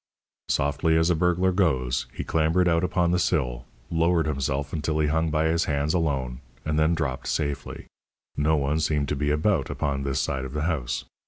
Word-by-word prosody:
Softly 70 +3 +1
as 80 +2 +3
a - - +3
burglar 90 +3 +2
goes, 65 -9 +1
he - - -5
clambered 80 +3 +2
out 85 0 +2
upon 90 -1 +1
the 90 - +2
sill, 60 -9 0 0.3
lowered 85 0 +2
himself 70 -1 -2
until 80 -1 -1
he 75 -1 +2
hung 80 +1 +1
by 80 0 +1
his 80 +1 +2
hands 75 +1 0
alone, 70 -8 -1 0.3
and 75 0 0
then 80 +2 +3
dropped 65 -5 -3
safely. 70 -2 -3 0.5
No 75 +2 +2
one 75 +1 0
seemed 75 -3 0
to - - 0
be 75 +1 -1
about 75 0 +1
upon 70 -2 -2
this 70 -1 -1
side 65 0 -1
of 65 0 -7
the 75 0 -2
house. 75 -8 -2
75 Hz, 190 wpm, -25 LUFS, 70-80 Hz, 0.5 s, as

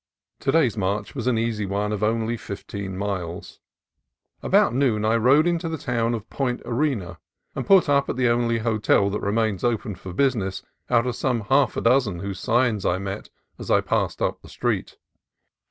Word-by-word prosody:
To 135 - 0
day's 145 -8 +3
march 100 0 -2
was 125 -3 -4
an 125 -3 +2
easy 110 -3 -1
one 100 +2 -1
of 105 -1 -3
only 115 +1 0
fifteen 100 -3 -6
miles. 95 -2 -4 0.8
About - - +3
noon 120 -5 +1
I 110 +1 +3
rode 130 +7 +4
into 170 -1 0
the 160 - -3
town 120 -3 -1
of 110 0 -7
Point 125 -3 -2
Arena, 115 - -1 0.3
and - - -5
put 195 -4 +6
up 140 -1 +2
at - - -1
the 125 -1 +2
only 120 0 +2
hotel 110 -3 +2
that 105 - -2
remains 105 -1 0
open 115 -3 0
for 95 0 -9
business 105 -4 0 0.3
out 115 +1 +3
of 125 -2 -2
some 125 -3 0
half 135 +7 +2
dozen 115 -6 +2
whose 100 -1 -5
signs 120 -4 +1
I 90 - +1
met 100 +1 -6 0.3
as - - -8
I - - +4
passed - - -1
up - - -1
the - - -14
street. - - -2
115 Hz, 185 wpm, -24 LUFS, 100-125 Hz, 0.8 s, put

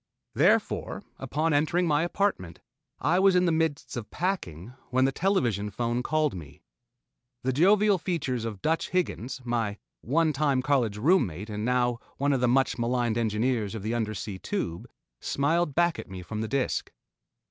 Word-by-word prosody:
Therefore, - - +1 0.2
upon 155 +2 0
entering 155 +5 +2
my 150 -2 +2
apartment, 175 - -1 0.4
I 165 +6 +2
was 195 -1 +5
in 180 0 +4
the 170 - +3
midst 160 -3 -1
of 115 -3 -5
packing 125 - -3 0.2
when 130 +1 +3
the 135 - +2
television 125 - 0
phone 120 +3 -1
called 155 +2 +1
me. 75 -5 -10 0.8
The 130 +1 0
jovial 200 +6 +4
features 140 - -2
of 110 -4 -6
"Dutch" 160 +1 0
Higgins, 135 -8 -2
my 115 -4 -1 0.2
one 155 +5 +1
time 135 -2 +1
college 125 -7 +1
room 150 - +4
mate 95 +6 -7
and 105 0 -4
now 125 0 +1 0.2
one 140 +1 +1
of 130 - 0
the 125 - +3
much 130 +1 +2
maligned 120 -1 0
engineers 110 -1 0
of 105 - -6
the 110 +2 -1
Undersea 110 -4 -3
Tube, 90 - -4 0.3
smiled 150 +2 0
back 170 0 +2
at - - -8
me 95 -1 -7
from 110 +4 -5
the 110 - -2
disk. 135 +2 -1
130 Hz, 170 wpm, -27 LUFS, 110-160 Hz, 0.8 s, was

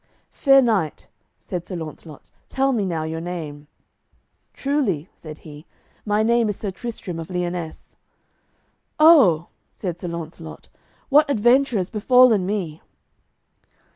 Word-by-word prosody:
"Fair 275 -1 +5
knight," 200 -10 -1 0.3
said 175 -2 -6
Sir 185 - -6
Launcelot, 155 -2 -9 0.2
"tell 270 +1 0
me 220 -6 0
now 165 -3 -2
your 160 +1 -4
name." 155 -4 -7 0.8
"Truly," 245 - -1
said 155 -2 -11
he, 150 0 -13 0.4
"my 210 +1 +2
name 235 0 +2
is 205 - -3
Sir 205 - -4
Tristram 195 -5 -6
of 165 - -7
Lyonesse." 175 -2 -5 1.0
"Oh," 255 - +6 0.2
said 175 -4 -6
Sir 180 - -6
Launcelot, 165 -1 -8 0.4
"what 295 +1 +5
adventure 250 +1 +3
is 185 -2 -3
befallen 225 -2 +4
me!" 185 -7 -3
185 Hz, 125 wpm, -22 LUFS, 165-235 Hz, 1.0 s, Oh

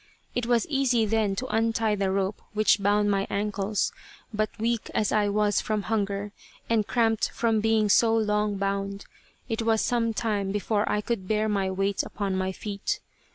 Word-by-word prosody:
It 245 -1 -1
was 240 -2 +3
easy 265 -6 +2
then 215 -2 +1
to 250 - -3
untie 225 -1 +1
the 200 -2 0
rope 195 +1 -1
which 215 -1 +3
bound 205 +1 +3
my 195 0 0
ankles, 205 0 -1 0.4
but 215 0 0
weak 230 +1 -1
as 210 - +1
I 210 -1 +2
was 210 0 +2
from 215 -2 -1
hunger, 205 -1 -1 0.4
and 220 -3 +1
cramped 225 -2 +1
from 225 -2 +1
being 220 -1 +3
so 225 +2 +4
long 210 -1 +1
bound, 200 0 -2 0.4
it 225 -2 -2
was 225 -1 +2
some 230 -1 +1
time 210 -3 -1
before 205 +1 0
I 210 - +1
could 210 -4 -3
bear 215 +1 +1
my 200 -3 0
weight 195 +1 0
upon 200 -2 -3
my 190 0 -1
feet. 200 +1 -3
210 Hz, 175 wpm, -26 LUFS, 200-225 Hz, 0.4 s, so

